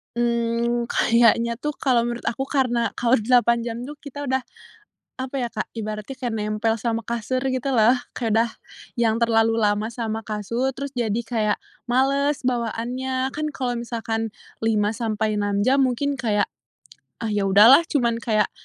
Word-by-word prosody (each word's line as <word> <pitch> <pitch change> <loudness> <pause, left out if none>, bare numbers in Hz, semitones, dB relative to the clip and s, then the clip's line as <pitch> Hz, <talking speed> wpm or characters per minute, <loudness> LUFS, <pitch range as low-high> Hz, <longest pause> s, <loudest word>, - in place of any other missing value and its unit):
Mmm, 235 0 0
kayaknya 235 0 +3
tuh 295 +6 -3
kalau 250 -4 +3
menurut 240 0 -4
aku 265 - -1
karena 250 -4 0
kalau 240 +1 +4
8 235 0 +3
jam 230 -1 -4
tuh 295 - -7
kita 285 -1 -8
udah 260 0 0 0.7
apa 260 +1 -5
ya, 250 - 0
Kak, - - -3
ibaratnya 215 +4 -5
kayak 245 -3 -3
nempel 215 +1 0
sama 230 -1 -2
kasur 235 +2 -2 0.2
gitu 260 +2 -2
loh. 235 -1 +5 0.2
Kayak 230 -3 -1
udah 230 +1 +3 0.5
yang 225 -2 +3
terlalu 225 -1 +3
lama 210 -1 +1
sama 225 -2 -4
kasur 230 +5 -2
terus 280 +1 -5
jadi 235 -4 -1
kayak 220 -3 0 0.3
males 275 +3 +1
bawaannya. 255 +2 -2
Kan 305 +2 -3
kalau 245 -2 -2
misalkan 225 -2 -3 0.2
5 215 -2 +1
sampai 215 -1 -1
6 205 0 0
jam 260 +5 +3
mungkin 275 +3 -1
kayak, 215 -5 0 0.7
"Ah, 225 - -1
ya 205 -1 0
udahlah," 220 - +7
cuman 235 -7 +1
kayak 215 -3 +1
235 Hz, 160 wpm, -23 LUFS, 225-255 Hz, 0.7 s, udahlah